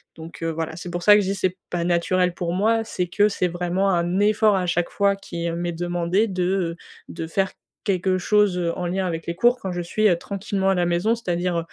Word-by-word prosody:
Donc, 165 +1 -11
heu, 165 - 0
voilà, 160 0 -4
c'est 175 +1 -7
pour 175 0 -3
ça 205 +2 +8
que 210 - +4
je 190 - -3
dis 195 - -1
c'est 185 -1 -1
pas 170 -1 -2
naturel 180 +1 +1
pour 175 -1 -3
moi, 225 +4 +2
c'est 180 -5 -3
que 205 +4 +3
c'est 185 -3 0
vraiment 180 +3 -1
un 175 0 +1
effort 210 0 +4
à 185 - -1
chaque 175 0 0
fois 200 -1 +2
qui 170 -3 -5
m'est 175 +1 -2
demandé 175 +4 0
de, 185 -3 -2
heu, 180 -2 0 0.3
de 165 -1 -6
faire 190 +3 0 0.3
quelque 185 -1 +1
chose, 205 0 +2
heu, 170 -1 -1
en 180 - -3
lien 190 +2 -1
avec 165 -2 -4
les 170 - -2
cours 240 +7 +3
quand 190 - -3
je 175 0 -3
suis, 215 +5 +2
heu, 175 - +3
tranquillement 195 +1 -2
à 195 - +3
la 175 -1 +1
maison, 175 +6 +1
c'est-à-dire, 175 -5 -1
180 Hz, 240 wpm, -23 LUFS, 170-195 Hz, 0.3 s, ça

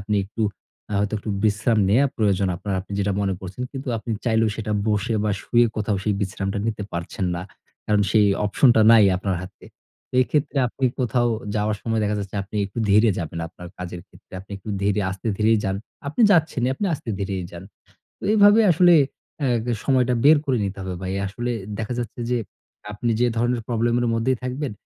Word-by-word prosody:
আপনি 105 +1 -2
একটু 110 +3 -5 0.5
আ - - -2
হয়তো 105 +1 0
একটু 105 - -5
বিশ্রাম 110 +2 +2
নেয়া 120 +8 +4
প্রয়োজন 100 -3 +1
আপনার, 100 +2 -4
আপনি 100 - -11
যেটা 100 0 0
মনে 100 -1 0
করছেন 95 +6 -7
কিন্তু 135 -1 -6
আপনি 115 - -7
চাইলেও 110 -1 +2
সেটা 105 -1 -3 0.2
বসে 110 +2 0
বা 105 - +1
শুয়ে 120 0 +3
কোথাও 105 -1 0
সেই 105 - +1
বিশ্রামটা 100 0 -2
নিতে 110 -2 -2
পারছেন 85 +2 -3
না। 85 - -4 0.4
কারণ 105 -1 +2
সেই 105 -1 +4 0.2
অপশনটা 120 +3 +4
নাই 110 -2 +7
আপনার 95 0 -2
হাতে। 95 - -12 0.5
তো - - -16
এক্ষেত্রে 145 +2 -1
আপনি 135 - -4 0.2
কোথাও 120 -1 +1 0.3
যাওয়ার 105 0 0
সময় 115 -1 0
দেখা 105 0 0
যাচ্ছে 100 0 -6
আপনি 100 +2 -8
একটু 100 +4 -9
ধীরে 105 +3 +5
যাবেন 85 0 -5
আপনার 90 +1 -11
কাজের 90 -1 -6
ক্ষেত্রে, - - -22
আপনি 95 - -19
একটু 100 +2 -8
ধীরে 100 +1 +1
আস্তে-ধীরেই 105 +3 +1
যান। 95 -1 -1 0.3
আপনি 155 +11 0
যাচ্ছেনিই 160 -9 +2
আপনি 205 - -2
আস্তে-ধীরেই 100 -7 -4
যান। 85 +1 -9 0.6
তো - - -27
এভাবে 205 +1 +7
আসলে 175 +1 +5 0.5
অ্যাগ 120 -5 +1 0.2
সময়টা 125 -2 +2
বের 155 +2 +8
করে 130 -4 +1
নিতে 100 0 -4
হবে 95 -1 -4
ভাই। 95 0 -3
আসলে 120 +5 -4 0.3
দেখা 115 +2 -3
যাচ্ছে 120 0 -5
যে 125 - +2 0.5
আপনি 115 +3 -2
যে 125 - +4
ধরনের 120 +1 +1
প্রবলেমের 120 +1 +1
মধ্যেই 120 +3 +1
থাকবেন, 130 +1 -3
110 Hz, 185 wpm, -23 LUFS, 100-120 Hz, 0.6 s, বের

